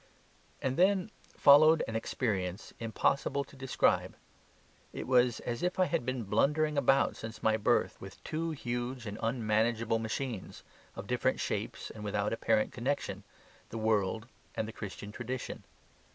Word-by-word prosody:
And 130 0 0
then 190 +2 +3 0.3
followed 155 +3 +7
an 110 - -4
experience 100 -5 -2
impossible 140 +5 0
to 140 - -17
describe. 135 -1 +1 0.8
It - - -5
was 125 -2 +3
as 120 -1 -3
if 180 0 0
I 185 - +4
had 130 -6 -1
been 130 -2 -1
blundering 150 +9 +2
about 135 -1 +3
since 110 -1 -8
my 110 0 +4
birth 110 - +1
with 95 0 -9
two 165 +2 -2
huge 120 -4 -3
and 105 0 -6
unmanageable 115 0 +1
machines, 110 -1 -4 0.3
of - - -6
different - - 0
shapes - - -3
and 105 - -9
without 105 0 -1
apparent 110 -1 +1
connection 120 -6 -2 0.5
the 115 - -6
world 110 0 +1 0.3
and 110 - -1
the 110 - -7
Christian 105 -1 -7
tradition. 120 +2 -5
120 Hz, 145 wpm, -31 LUFS, 110-135 Hz, 0.8 s, followed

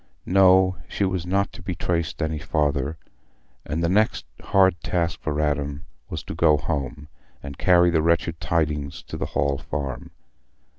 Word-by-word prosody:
No, 95 0 +5
she 100 - -1
was 95 -2 -2
not 100 +2 0
to - - -10
be 90 +1 -4
traced 85 -1 -2
any 80 -1 -2
farther; 75 -1 -1 0.7
and 80 +3 -2
the - - +3
next 105 +5 +1 0.2
hard 95 -3 +4
task 85 -1 -1
for 75 -1 -2
Adam 75 -1 -1 0.2
was - - -5
to - - -6
go 80 -2 +4
home 70 0 -4 0.4
and 70 0 -7
carry 90 -1 +5
the 80 -2 +2
wretched 85 0 +1
tidings 75 -4 -1
to - - -8
the - - -3
Hall 70 0 +1
Farm. 70 -3 -5
80 Hz, 160 wpm, -24 LUFS, 75-90 Hz, 0.7 s, No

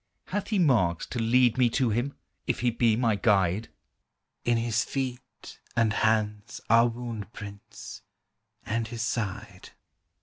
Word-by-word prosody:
Hath 205 +1 -2
He 215 - 0
marks 115 - +2
to 120 - -5
lead 120 +2 +3
me 125 -2 +5
to 125 -1 +1
Him, 120 +6 -1 0.3
If - - -1
He 120 -1 +2
be 115 -1 +2
my 115 -2 +2
Guide? 100 0 +2 0.7
"In 120 -1 +2
His 115 0 +1
feet 130 -3 -6 0.2
and 115 -2 +2
hands 110 +1 0
are 115 +1 +6
wound 115 -3 -6
prints, 100 -1 -10 0.6
And 115 +1 -1
His 115 0 -4
side." 110 -4 -4
115 Hz, 140 wpm, -27 LUFS, 105-120 Hz, 0.7 s, are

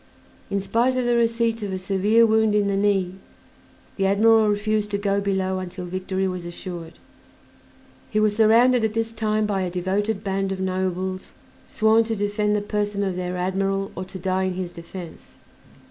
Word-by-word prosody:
In 200 - 0
spite 235 +6 +1
of 250 - 0
the 240 0 +2
receipt 230 -1 +1
of 205 -2 -3
a 190 - -2
severe 200 +4 +3
wound 220 -1 +3
in 205 -1 +3
the 200 0 0
knee, 195 -2 +1 0.8
the 195 -1 +2
admiral 220 +2 +4
refused 210 0 0
to 200 - -1
go 200 0 0
below 190 -1 -1
until 180 0 -6
victory 185 +1 -2
was 180 -1 -4
assured. 170 -1 -7 1.2
He 215 - 0
was 215 -1 +2
surrounded 230 +3 +5
at 220 0 0
this 225 0 -1
time 215 -1 0
by 200 -2 -1
a 185 - -1
devoted 195 +4 -1
band 195 -1 -1
of 190 - -3
nobles 185 0 -2 0.3
sworn 220 +1 +3
to 225 0 -2
defend 210 0 0
the 210 - 0
person 205 -1 -2
of 190 -2 -1
their 180 0 -3
admiral 195 +2 -1
or 185 - -4
to 190 +1 -9
die 190 +1 0
in 185 -1 -2
his 180 -1 -4
defense. 170 0 -10
200 Hz, 180 wpm, -23 LUFS, 185-215 Hz, 1.2 s, surrounded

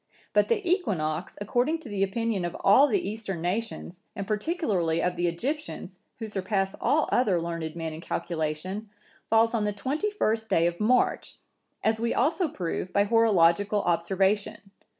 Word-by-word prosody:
But - - +4
the 425 -5 0
equinox, 180 - -1
according 245 +10 0
to 300 - -11
the 205 -3 -3
opinion 205 0 0
of 175 0 -3
all 265 +9 +6
the 370 +3 0
Eastern 205 -4 -4
nations, 185 -1 -3
and 200 - -4
particularly 210 - 0
of 180 +1 0
the 175 0 0
Egyptians,(966) 270 - -4 0.2
who 225 - -5
surpass 195 -1 -1
all 305 +1 +2
other 210 -8 +3
learned 165 -1 -4
men 165 -1 -4
in 160 - -8
calculation, 170 +6 -3 0.4
falls 225 +1 +4
on 225 -3 +1
the 210 - 0
twenty 270 - -2
first 220 - -1
day 165 -4 +3
of 170 0 -1
March, 245 +4 +1 0.5
as 220 0 +2
we 235 +1 0
also 320 +7 +2
prove 180 - -4
by 200 - +3
horological 205 -2 +3
observation. 195 +4 0
205 Hz, 160 wpm, -27 LUFS, 175-230 Hz, 0.5 s, all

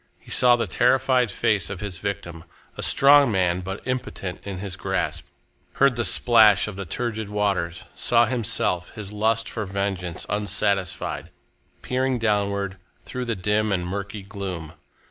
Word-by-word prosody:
He - - -13
saw 125 -1 +6
the 115 - -1
terrified 125 -1 +2
face 95 -3 +1
of 95 - -5
his 100 -4 -5
victim, 85 -5 -5 0.3
a - - -6
strong 140 -2 +5
man 90 -2 +1
but 95 +2 -6
impotent 125 -7 -4
in 100 -2 -5
his 95 -1 -4
grasp; - - -2 0.5
heard 140 -2 +3
the 120 - -1
splash 110 -4 +5
of 105 - -6
the 100 -1 -6
turgid 110 +1 -3
waters; 100 -5 -1
saw 120 0 +3
himself, 110 -7 -1
his 105 -1 -7
lust 110 +2 +1
for 105 -3 -4
vengeance 95 -3 -2
unsatisfied, 100 -2 -1 0.5
peering 130 0 0
downwards 100 -3 0 0.3
through 125 0 -4
the 115 -2 -1
dim 105 +3 0
and 90 -2 0
murky 100 +2 -5
gloom. 95 -5 -6
105 Hz, 150 wpm, -24 LUFS, 95-115 Hz, 0.5 s, saw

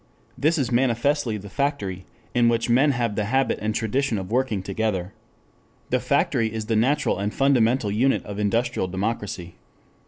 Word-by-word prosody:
This 160 +4 +1
is 135 -5 -1
manifestly 125 0 +1
the 100 0 -9
factory, 100 -7 -2 0.3
in 120 -1 +4
which 115 0 0
men 135 +5 +4
have 120 -5 0
the 105 - 0
habit 135 +5 +1
and 110 0 -1
tradition 120 +2 0
of 95 +1 -6
working 120 -6 0
together. 100 -2 -2 0.8
The - - +3
factory 110 -1 +1
is 110 -1 -4
the 110 0 0
natural 125 0 +1
and 100 +1 -1
fundamental 125 -5 +2
unit 125 +6 +1
of 105 0 -6
industrial 115 0 0
democracy. 95 -2 -4
115 Hz, 160 wpm, -24 LUFS, 105-130 Hz, 0.8 s, in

